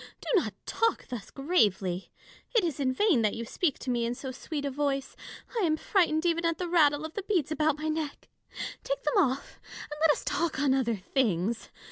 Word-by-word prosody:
Do - - -8
not 215 -8 -5
talk 455 0 0
thus 245 -5 -6
gravely. 205 - +1 0.4
It 455 - +5
is 320 -5 -1
in 265 -2 +2
vain 315 - +3
that 215 -2 +1
you 230 - -4
speak 305 +5 0
to 255 - -3
me 240 -1 +1
in 235 +1 -1
so 265 0 -6
sweet 285 +3 -5
a 280 - -1
voice. 275 -1 -1 0.4
I - - +1
am 310 -3 +2
frightened 335 -3 +2
even 335 0 +2
at 335 -1 +1
the 360 - -2
rattle 305 -3 +4
of 315 - -7
the 410 - -3
beads 365 -7 0
about 310 -1 +2
my 310 +1 -3
neck: 310 -2 -3 0.6
take - - -2
them 475 - +1
off, 280 -7 +1 0.3
and 295 - -6
let 320 - +5
us 295 - +2
talk 335 -5 0
on 275 -2 +3
other 245 -4 +1
things. 215 -1 0
290 Hz, 210 wpm, -29 LUFS, 255-335 Hz, 0.6 s, It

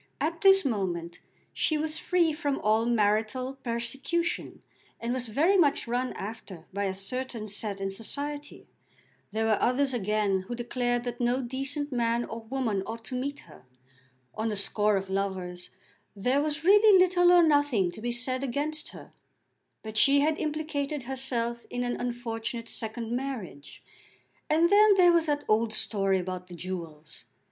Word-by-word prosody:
At 335 +2 -2
this 390 -3 +6
moment 175 -8 -2 0.3
she 310 - +1
was 310 +1 -2
free 345 -3 +2
from 285 -2 -1
all 220 +2 +2
marital 235 +4 0
persecution, 265 +8 -2 0.4
and 235 +1 -2
was 255 -1 -2
very 310 - +2
much 295 -9 +2
run 250 +2 -1
after 195 -5 -8
by 200 +1 -1
a 190 - -1
certain 230 +2 -5
set 205 -1 -3
in 195 0 -2
society. 290 +8 -5 0.7
There 220 +2 -1
were 220 -2 +2
others 265 +2 +2
again 210 -3 0
who 240 - -4
declared 245 0 -1
that 245 0 -5
no 245 +2 +2
decent 275 +4 -4
man 235 -1 0
or 230 - -7
woman 230 -5 -1
ought 225 +1 -7
to 255 - -4
meet 280 +4 -3
her. 130 - -17 0.7
On 220 +1 -2
the 210 - -2
score 205 +1 +1
of 195 0 -4
lovers 185 -2 -3 0.5
there 250 +8 +1
was 300 0 -2
really 410 +2 +7
little 355 -1 +5
or 350 -1 +7
nothing 285 - +3
to 215 - -10
be 240 - -2
said 255 +2 +1
against 295 +4 -2
her; - - -12 0.7
but 220 0 -6
she 280 0 +6
had 310 +1 +1
implicated 300 -2 -2
herself 240 -2 -2
in 245 0 -2
an 245 0 -1
unfortunate 235 -1 -4
second 225 +1 -4
marriage, 240 - -5 0.7
and 330 +3 +3
then 415 0 +7
there 360 -2 +6
was 335 -1 +2
that 290 -1 -1
old 220 +1 +2
story 195 -3 +2
about 180 0 -5
the 175 - -10
jewels! 165 -4 -7
240 Hz, 160 wpm, -28 LUFS, 215-290 Hz, 0.7 s, really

